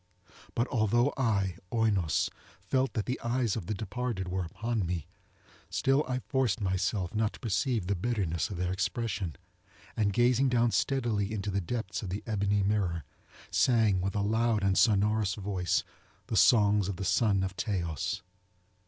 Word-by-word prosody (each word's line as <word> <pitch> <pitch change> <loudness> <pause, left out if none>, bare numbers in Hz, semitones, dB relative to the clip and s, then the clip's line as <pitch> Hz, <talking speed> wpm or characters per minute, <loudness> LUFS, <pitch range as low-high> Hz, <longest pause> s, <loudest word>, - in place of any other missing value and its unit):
But 120 +2 +1
although 120 +2 +2
I, 100 -8 0
Oinos, 100 -9 +1 0.3
felt 130 0 0
that 110 -5 -1
the 125 - -2
eyes 120 -2 0
of 110 -7 -5
the 105 - -1
departed 110 -1 -3
were 95 0 -1
upon 110 +5 -2
me, 85 -3 -3 0.6
still 135 +2 +2
I 130 0 -2
forced 130 -4 +1
myself 95 -1 -1
not 110 0 0
to - - -12
perceive 110 0 0
the 100 - 0
bitterness 95 -4 -1
of 100 - -5
their 90 0 -1
expression, 95 -2 -2 0.6
and 105 -3 +1
gazing 125 +5 +3
down 120 -1 +3
steadily 115 -8 0
into 105 -1 -3
the 100 +1 0
depths 95 +2 -3
of 100 - -5
the 100 +3 -4
ebony 100 -2 +1
mirror, 95 -5 0 0.5
sang 110 -7 +3
with 95 +2 -2
a 100 - +1
loud 110 0 +1
and 95 -1 +2
sonorous 105 -2 +3
voice 95 -4 -1 0.4
the - - -3
songs 105 -2 +5
of 100 - -2
the 95 - -4
son 100 -1 +2
of 95 0 -3
Teios. 95 0 -2
105 Hz, 160 wpm, -30 LUFS, 95-115 Hz, 0.6 s, songs